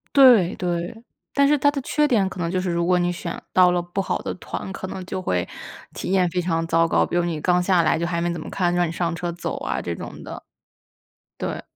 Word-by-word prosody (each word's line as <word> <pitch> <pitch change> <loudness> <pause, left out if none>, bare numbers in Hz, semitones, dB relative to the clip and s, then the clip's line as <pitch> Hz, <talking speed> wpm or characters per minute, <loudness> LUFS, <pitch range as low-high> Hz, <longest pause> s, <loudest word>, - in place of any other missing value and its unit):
对， 245 -10 +7
对， 175 +6 -3 0.3
但 280 0 +4
是 295 +1 +4
它 285 +1 +3
的 285 -1 -3
缺 300 +3 +2
点 210 -8 +3
可 190 - -8
能 170 -1 -1
就 185 +1 0
是 185 - -2
如 170 0 0
果 180 +1 +3
你 175 0 +1
选 175 -1 -5
到 180 -1 +6
了 180 0 +1
不 175 +3 -3
好 - - -1
的 - - -4
团， 190 - -6
可 190 - -6
能 185 0 -6
就 185 0 -4
会， 90 - -1 0.5
体 - - -4
验 185 -2 +3
非 180 +1 0
常 165 -1 0
糟 165 0 +3
糕。 - - +3
比 - - -3
如 175 - +3
你 165 -3 -2
刚 180 +2 +2
下 180 -1 +3
来 160 - +2
就 165 - -1
还 170 -1 -1
没 175 +1 0
怎 170 - -5
么 - - -7
看， 175 -2 0
让 175 0 +2
你 - - -4
上 170 0 -1
车 175 +1 -3
走 170 - -4
啊 65 +3 -2
这 85 - -3
种 - - -8
的。 - - -8 1.0
对。 - - -3
175 Hz, 275 characters per minute, -23 LUFS, 170-190 Hz, 1.0 s, 对